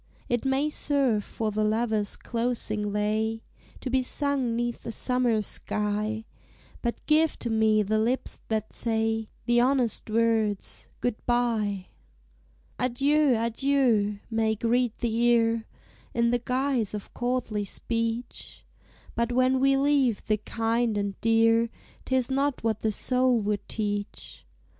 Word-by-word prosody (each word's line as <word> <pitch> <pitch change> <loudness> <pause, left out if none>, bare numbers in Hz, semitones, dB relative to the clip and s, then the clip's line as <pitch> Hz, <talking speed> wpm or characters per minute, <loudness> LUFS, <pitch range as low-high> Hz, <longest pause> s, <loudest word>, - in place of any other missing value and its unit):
It 240 +1 -1
may 270 +2 +2
serve 270 -9 +1
for 220 +1 -3
the 215 +1 0
lover's 215 -1 0
closing 230 -3 -2
lay, 220 +2 -1 0.4
To 255 - -4
be 260 0 +3
sung 265 -2 -1
'neath 240 0 -2
a - - -2
summer 240 -2 +1
sky; 210 +2 -2 0.6
But 235 -1 -3
give 315 +1 +3
to 235 - -4
me 220 -1 +3
the 215 +2 +1
lips 240 +4 -1
that 220 -1 -2
say 225 -1 -1 0.2
The 240 0 +3
honest 250 -4 +1
words, 220 -2 0
"Good 245 -3 -2
bye!" 220 -6 +1 0.9
"Adieu! 275 +3 +3
adieu!" 230 -3 +1
may 220 -1 +1
greet 235 +1 +1
the 235 -2 -1
ear, 230 -1 +2 0.5
In 235 0 +3
the 245 - +2
guise 250 -4 0
of 205 - -8
courtly 240 -4 -1
speech: 230 +3 -4 0.5
But 235 +1 0
when 255 +1 +3
we 270 +1 +4
leave 275 -5 +2
the 215 - +2
kind 225 +1 0
and 200 -1 -1
dear, 225 0 +4 0.4
'Tis 260 -1 0
not 275 -1 0
what 220 -2 0
the 220 - 0
soul 250 +2 +2
would 205 0 -2
teach. 205 -2 -4
230 Hz, 135 wpm, -27 LUFS, 215-250 Hz, 0.9 s, we